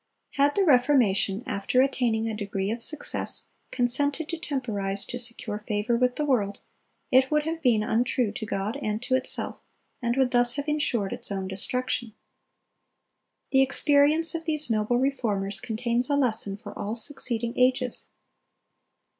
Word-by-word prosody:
(298) 280 Hz, -, +1 dB
Had 290 Hz, +1 st, +2 dB
the 390 Hz, -2 st, +2 dB
Reformation, 245 Hz, -7 st, +3 dB
after 250 Hz, -1 st, -1 dB
attaining 245 Hz, -4 st, +1 dB
a 220 Hz, -, -3 dB
degree 200 Hz, -1 st, -3 dB
of 230 Hz, +1 st, -4 dB
success, 305 Hz, +4 st, +1 dB, 0.2 s
consented 285 Hz, +5 st, +1 dB
to 340 Hz, -, -2 dB
temporize 220 Hz, -, -2 dB
to 245 Hz, -, -4 dB
secure 235 Hz, -3 st, +1 dB
favor 210 Hz, +2 st, -1 dB
with 250 Hz, +1 st, +1 dB
the 300 Hz, -, -1 dB
world, 205 Hz, -8 st, 0 dB, 0.5 s
it 260 Hz, +1 st, +5 dB
would 300 Hz, 0 st, +1 dB
have 325 Hz, +1 st, -4 dB
been 235 Hz, -6 st, +3 dB
untrue 235 Hz, +1 st, 0 dB
to 220 Hz, -, -6 dB
God 210 Hz, +5 st, -3 dB
and 215 Hz, -3 st, -2 dB
to 255 Hz, -, -2 dB
itself, 260 Hz, 0 st, -1 dB, 0.4 s
and 240 Hz, +1 st, -1 dB
would 260 Hz, -2 st, +2 dB
thus 245 Hz, -1 st, +3 dB
have 285 Hz, 0 st, -4 dB
insured 260 Hz, -9 st, 0 dB
its -, -, -7 dB
own 190 Hz, -1 st, -3 dB
destruction. 235 Hz, +3 st, -2 dB, 1.4 s
The 270 Hz, -1 st, +5 dB
experience 290 Hz, +4 st, +4 dB
of 330 Hz, -1 st, -5 dB
these 305 Hz, -5 st, +1 dB
noble 220 Hz, +2 st, +1 dB
Reformers 215 Hz, -7 st, -1 dB
contains 235 Hz, +2 st, -1 dB
a 285 Hz, -, +2 dB
lesson 220 Hz, -7 st, 0 dB
for 225 Hz, -, -10 dB
all 210 Hz, +2 st, -4 dB
succeeding 235 Hz, -2 st, -3 dB
ages. 250 Hz, -1 st, +1 dB
245 Hz, 155 wpm, -26 LUFS, 215-275 Hz, 1.4 s, it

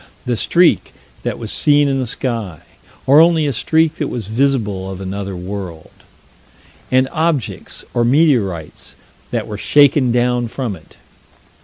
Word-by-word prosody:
The 125 Hz, -, 0 dB
streak 175 Hz, +9 st, +2 dB, 0.3 s
that -, -, -3 dB
was -, -, -6 dB
seen 145 Hz, -1 st, +3 dB
in 135 Hz, -1 st, 0 dB
the 130 Hz, -, -2 dB
sky 110 Hz, -, -4 dB, 0.4 s
or 140 Hz, +3 st, +6 dB
only 165 Hz, -2 st, +4 dB
a 140 Hz, -, 0 dB
streak 160 Hz, +6 st, +1 dB
that 150 Hz, -, -2 dB
was 115 Hz, -6 st, -5 dB
visible 110 Hz, -6 st, 0 dB
of 95 Hz, -1 st, -7 dB
another 95 Hz, 0 st, -5 dB
world 90 Hz, -3 st, -7 dB, 1.0 s
and 130 Hz, +1 st, +3 dB
objects, 160 Hz, -6 st, -2 dB
or 120 Hz, -, +1 dB
meteorites, 120 Hz, -, 0 dB, 0.3 s
that -, -, -2 dB
were 105 Hz, -1 st, -7 dB
shaken 140 Hz, -2 st, +4 dB
down 120 Hz, 0 st, +1 dB
from 115 Hz, -3 st, -4 dB
it. 80 Hz, -4 st, -18 dB
125 Hz, 145 wpm, -17 LUFS, 100-145 Hz, 1.0 s, or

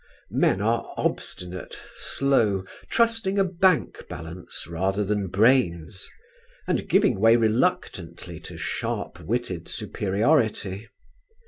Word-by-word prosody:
Men 95 Hz, -, +3 dB
are 115 Hz, +2 st, 0 dB
obstinate, 90 Hz, 0 st, -3 dB, 0.2 s
slow, 110 Hz, -9 st, +1 dB, 0.2 s
trusting 225 Hz, -4 st, +2 dB
a 195 Hz, -, +5 dB
bank 180 Hz, -, +1 dB
balance 85 Hz, +2 st, -7 dB
rather 95 Hz, +4 st, -1 dB
than 100 Hz, -1 st, -1 dB
brains; 95 Hz, -, +2 dB, 0.6 s
and -, -, -1 dB
giving 190 Hz, -, +3 dB
way 115 Hz, +1 st, +7 dB
reluctantly 115 Hz, -, 0 dB
to -, -, -10 dB
sharp -, -, -3 dB
witted 100 Hz, -7 st, -3 dB
superiority. 105 Hz, -1 st, 0 dB
110 Hz, 100 wpm, -25 LUFS, 95-135 Hz, 0.6 s, way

